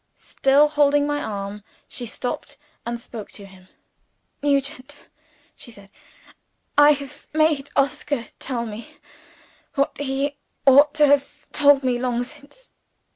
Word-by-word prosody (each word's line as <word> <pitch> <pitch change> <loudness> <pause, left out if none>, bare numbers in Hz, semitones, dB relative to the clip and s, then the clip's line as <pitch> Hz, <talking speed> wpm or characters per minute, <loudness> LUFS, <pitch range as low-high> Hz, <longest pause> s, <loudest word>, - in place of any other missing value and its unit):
Still 275 +2 +3
holding 290 -1 +3
my 290 0 -1
arm, 200 0 -5 0.2
she 245 -3 -7
stopped 275 +5 -5 0.3
and 235 0 -3
spoke 230 -3 -9
to 200 - -9
him. 190 -1 -17 0.7
"Nugent," 280 0 -1 0.6
she 240 - -12
said, 200 -3 -16 0.8
"I 290 +1 +7
have 280 -2 -9
made 310 -3 +2
Oscar 275 -2 0
tell 240 -3 -3
me 220 +1 -9 0.8
what 275 0 0
he 280 +1 -2 0.3
ought 285 +2 +6
to 300 -1 +5
have 285 +1 +1
told 285 -2 +4
me 250 -2 0
long 245 -1 -1
since." 295 - -14
275 Hz, 130 wpm, -22 LUFS, 240-290 Hz, 0.8 s, I